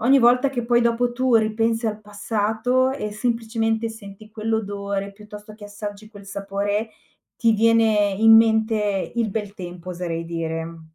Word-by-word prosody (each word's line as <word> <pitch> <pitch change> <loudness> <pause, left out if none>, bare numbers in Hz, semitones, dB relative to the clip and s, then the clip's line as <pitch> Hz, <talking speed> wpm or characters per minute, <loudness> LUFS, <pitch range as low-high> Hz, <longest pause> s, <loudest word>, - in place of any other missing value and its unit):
ogni 265 +4 +5
volta 250 +3 +4
che 245 -3 -3
poi 240 0 +2
dopo 235 +1 +1
tu 255 -1 +2
ripensi 225 +1 0
al 215 0 -3
passato, 220 +5 0
e 240 -6 -4
semplicemente 225 0 -1
senti 215 -1 -12
quell'odore, 200 -2 -3
piuttosto 210 +1 -12
che 210 -1 -12
assaggi 205 +1 -8
quel 205 -2 -13
sapore, 200 +2 -3 0.4
ti 230 -2 +2
viene 220 -2 +3
in 225 0 +8
mente 220 -3 +2
il 230 -3 0
bel 205 -1 -4
tempo 180 -2 -9
oserei 170 -2 -4
dire. 165 0 -4
215 Hz, 150 wpm, -22 LUFS, 200-230 Hz, 0.4 s, in